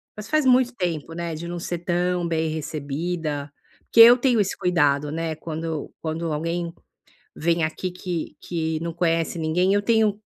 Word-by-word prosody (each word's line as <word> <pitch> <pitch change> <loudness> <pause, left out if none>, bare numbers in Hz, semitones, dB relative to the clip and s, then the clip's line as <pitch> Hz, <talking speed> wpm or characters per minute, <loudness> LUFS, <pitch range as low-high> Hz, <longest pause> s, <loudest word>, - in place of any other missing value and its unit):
Mas 210 0 -8
faz 310 -2 +2
muito 255 -1 +4
tempo, 165 -5 -3
né 170 -1 -4
de 160 +2 -6
não 175 0 -4
ser 175 0 -4
tão 175 0 0
bem 160 -1 0
recebida, 155 0 -3 0.3
porque - - 0
eu 235 +2 +11
tenho 245 -2 +2
esse 200 -2 0
cuidado, 145 -6 +2
né, 165 0 -2
quando 160 0 -5
quando 165 +1 -3
alguém 165 +2 -2 0.6
vem 170 0 +1
aqui 160 +4 -3
que 180 -2 -5
que 160 -2 -2
não 170 0 -3
conhece 165 0 0
ninguém, 170 +4 +1
eu 205 - +3
tenho 215 -1 +2
170 Hz, 170 wpm, -24 LUFS, 160-180 Hz, 0.6 s, eu